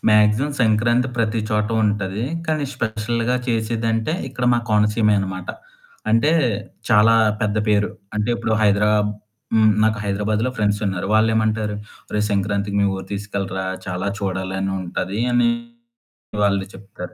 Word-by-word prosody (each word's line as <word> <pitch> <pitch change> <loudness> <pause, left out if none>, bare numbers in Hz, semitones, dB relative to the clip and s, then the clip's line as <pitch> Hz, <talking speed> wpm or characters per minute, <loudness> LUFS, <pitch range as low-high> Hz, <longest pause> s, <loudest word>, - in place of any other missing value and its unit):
Maximum 105 +6 +4
Sankranti 120 +3 +3
ప్రతి 115 0 0
చోట 105 0 +1 0.2
ఉంటది. 105 +1 -1 0.2
కానీ 155 -2 0
స్పెషల్‌గా 115 +1 -1
చేసేదంటే, 115 +2 0 0.2
ఇక్కడ 130 -1 -4
మా 120 - +2
కోనసీమె 105 0 +3
అనమాట. 95 -2 -4 0.6
అంటే 115 +8 +4 0.6
చాలా 110 0 +5 0.3
పెద్ద 105 0 0
పేరు. 105 -1 +2 0.3
అంటే 105 +2 0
ఇప్పుడు 115 -1 -2
హైదరా 105 0 +3 0.6
హ్మ్, 110 -1 +5
నాకు 110 -1 +2
హైదరాబాద్‌లో 105 +4 0
ఫ్రెండ్సున్నారు. 105 -3 0
వాళ్ళేమంటారు, 110 -1 +2 0.4
"ఒరే 105 - 0
సంక్రాంతికి 100 0 -1
మీ 100 - +3
ఊరు 95 - -6
తీసుకెళ్ళరా, 100 -2 -3 0.2
చాలా 90 +1 -3
చూడాలని 95 0 -2
ఉంటది" 95 +3 -3
అని 120 - +4 0.9
వాళ్ళు 100 -1 +2
చెప్తారు. 95 -2 -10
105 Hz, 125 wpm, -21 LUFS, 100-110 Hz, 0.9 s, చాలా